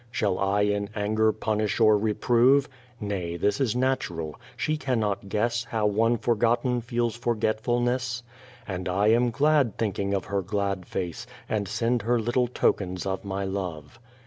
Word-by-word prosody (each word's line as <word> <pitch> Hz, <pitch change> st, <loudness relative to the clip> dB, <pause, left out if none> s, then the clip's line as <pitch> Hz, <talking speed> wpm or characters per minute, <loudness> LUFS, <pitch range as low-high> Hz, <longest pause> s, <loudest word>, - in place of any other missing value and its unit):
Shall 100 Hz, -5 st, 0 dB
I 100 Hz, +1 st, +1 dB
in 100 Hz, 0 st, 0 dB
anger 110 Hz, +1 st, +2 dB
punish 110 Hz, 0 st, -1 dB
or 110 Hz, -2 st, +6 dB
reprove? 120 Hz, +6 st, +3 dB, 0.3 s
Nay, 95 Hz, -6 st, -3 dB
this 105 Hz, +9 st, 0 dB
is 120 Hz, -4 st, +1 dB
natural; 105 Hz, -, -1 dB, 0.2 s
she 155 Hz, -, 0 dB
cannot 110 Hz, -9 st, -1 dB
guess 115 Hz, +3 st, 0 dB
How 115 Hz, -2 st, -1 dB
one 115 Hz, +3 st, +2 dB
forgotten 120 Hz, +2 st, +1 dB
feels 120 Hz, -1 st, -1 dB
forgetfulness; 120 Hz, +2 st, 0 dB, 0.4 s
And 90 Hz, -2 st, -3 dB
I 100 Hz, +4 st, +2 dB
am 120 Hz, +2 st, +4 dB
glad 140 Hz, -1 st, +2 dB
thinking 100 Hz, -2 st, -1 dB
of 95 Hz, -, -2 dB
her 100 Hz, -1 st, -1 dB
glad 100 Hz, -1 st, -2 dB
face, 95 Hz, +7 st, -4 dB, 0.2 s
And 105 Hz, -2 st, -1 dB
send 115 Hz, +3 st, 0 dB
her 120 Hz, +3 st, +1 dB
little 120 Hz, +2 st, +1 dB
tokens 95 Hz, -6 st, 0 dB
of 95 Hz, -1 st, -2 dB
my 100 Hz, 0 st, -3 dB
love. 95 Hz, -1 st, -5 dB
110 Hz, 150 wpm, -26 LUFS, 100-120 Hz, 0.4 s, or